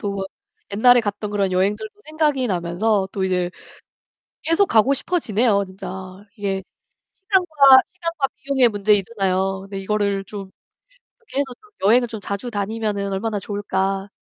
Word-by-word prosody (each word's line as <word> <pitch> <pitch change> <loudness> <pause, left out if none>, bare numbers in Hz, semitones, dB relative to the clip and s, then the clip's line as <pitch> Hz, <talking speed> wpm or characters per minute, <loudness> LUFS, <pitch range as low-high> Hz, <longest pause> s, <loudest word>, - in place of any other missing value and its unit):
또 200 -2 -3 0.5
옛날에 245 +4 +6
갔던 205 -1 -4
그런 200 -2 0
여행들도 205 +4 0
생각이 300 -4 +1
나면서 190 +2 0
또 195 - -1
이제 180 -1 0 0.9
계속 330 +5 +3
가고 230 +5 +4
싶어 355 +6 0
지네요 215 -5 +2
진짜. 185 -1 -9 0.5
이게 195 -2 -2 0.5
시간과, 380 -5 0 0.3
시간과 335 -5 -2
비용의 265 -2 +2
문제이잖아요. 195 -2 +1
근데 195 0 -7
이거를 200 0 -1
좀 195 -1 -8 0.7
'어떻게 445 -11 -7
해서 275 -2 -1
좀 425 - -22 0.2
여행을 240 +2 +4
좀 220 -2 -7
자주 200 +5 -4
다니면은 205 -1 -2
얼마나 210 +2 -2
좋을까.' 195 -1 -2
205 Hz, 325 characters per minute, -21 LUFS, 195-245 Hz, 0.9 s, 옛날에